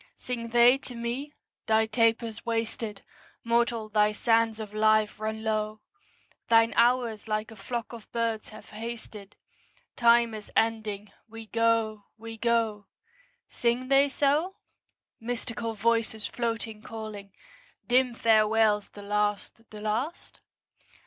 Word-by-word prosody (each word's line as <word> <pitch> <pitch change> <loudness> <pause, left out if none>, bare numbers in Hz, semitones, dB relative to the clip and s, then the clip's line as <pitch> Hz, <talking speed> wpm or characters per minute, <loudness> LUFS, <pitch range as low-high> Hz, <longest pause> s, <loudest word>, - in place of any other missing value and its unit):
Sing 240 -2 -5
they 240 +3 +5
to 250 -2 -9
me? 240 +5 -4 0.4
'Thy 220 0 +4
taper's 230 0 +1
wasted; 225 -2 -3 0.4
Mortal, 235 -1 +1
thy 210 0 +3
sands 225 0 +2
of 210 -1 -7
life 215 0 +2
run 220 0 -3
low; 215 -1 -1 0.7
Thine 230 0 +5
hours 235 -2 +2
like 215 +1 -2
a - - -11
flock 235 +3 -5
of 230 -2 -11
birds 230 -2 -2
have 215 - -13
hasted: 215 -2 -8 0.6
Time 235 -1 +4
is 215 -1 -9
ending; 215 -3 0 0.2
we 225 0 -9
go, 225 -2 +1
we 225 0 -8
go.' 225 -3 0 0.6
Sing 245 +2 -1
they 275 +1 +5
so? 295 +7 +1 0.6
Mystical 230 -1 -4
voices, 220 0 0
floating, 225 -2 -3
calling; 215 -3 -8 0.5
Dim 250 -1 +2
farewells 215 -2 +3
the 205 - -12
last, 210 +2 -2
the 210 -1 -10
last? 225 +10 -3
225 Hz, 120 wpm, -28 LUFS, 215-235 Hz, 0.7 s, they